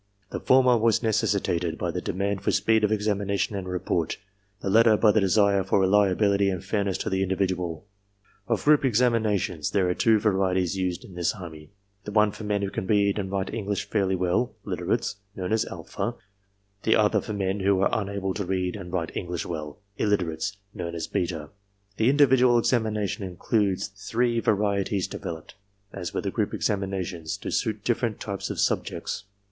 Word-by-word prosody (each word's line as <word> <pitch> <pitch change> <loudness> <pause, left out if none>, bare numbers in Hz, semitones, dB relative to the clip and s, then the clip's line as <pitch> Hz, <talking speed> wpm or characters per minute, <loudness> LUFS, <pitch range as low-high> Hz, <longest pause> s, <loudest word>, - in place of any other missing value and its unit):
The - - -3
former 125 -2 +4
was 115 +2 +2
necessitated 95 -6 0
by - - -2
the - - -3
demand 100 +1 -2
for - - 0
speed 110 -1 +2
of 105 - +3
examination 100 -1 0
and 95 -2 -4
report, 90 -2 -1 0.4
the 95 - -2
latter 110 0 +6
by 110 -1 +5
the 110 - +3
desire 100 0 +3
for 95 +1 +2
reliability 100 +1 +3
and 95 -1 -4
fairness 100 -3 0
to - - -3
the 95 0 +1
individual. 90 -3 -1 0.6
Of - - 0
group 150 -1 +5
examinations, 110 - +1
there 95 -3 +1
are 90 - +2
two 110 +3 +4
varieties 95 -3 +1
used 90 -2 -2
in 95 - -13
the 85 -1 0
Army; 80 -4 -9 0.3
the 105 - -6
one 105 0 +4
for 110 - -9
men 105 -1 -1
who 100 - -2
can 95 - -4
read 100 0 +2
and 95 -1 -3
write 95 -1 -2
English 105 -2 -3
fairly 95 -3 +1
well 90 +7 0
(literates), - - -2 0.2
known 95 +2 -2
as 110 - +2
alpha; 120 - -4 0.7
the 110 - +3
other 105 -1 +3
for 105 - -5
men 95 0 -1
who 95 0 +2
are - - +4
unable 100 -1 -3
to 105 - -3
read 90 -1 -1
and 95 -4 -8
write 85 -2 -3
English 90 -2 -3
well 75 +1 -6 0.2
(illiterates), 100 -1 0 0.2
known 85 -3 -5
as 80 - -3
beta. 80 -4 -3 0.5
The 110 +3 +3
individual 130 -3 +5
examination 110 -4 0
includes 95 +2 0
three 115 +4 -1
varieties 100 -3 +1
de - - -7
veloped, 80 -2 -7 0.4
as 90 -4 -5
were - - -2
the - - -3
group - - -1
examinations, 95 -5 -2
to - - -6
suit 110 -2 -1
different 120 -2 0
types 100 -2 -4
of - - -4
subjects. 105 - -1
100 Hz, 180 wpm, -26 LUFS, 90-105 Hz, 0.7 s, latter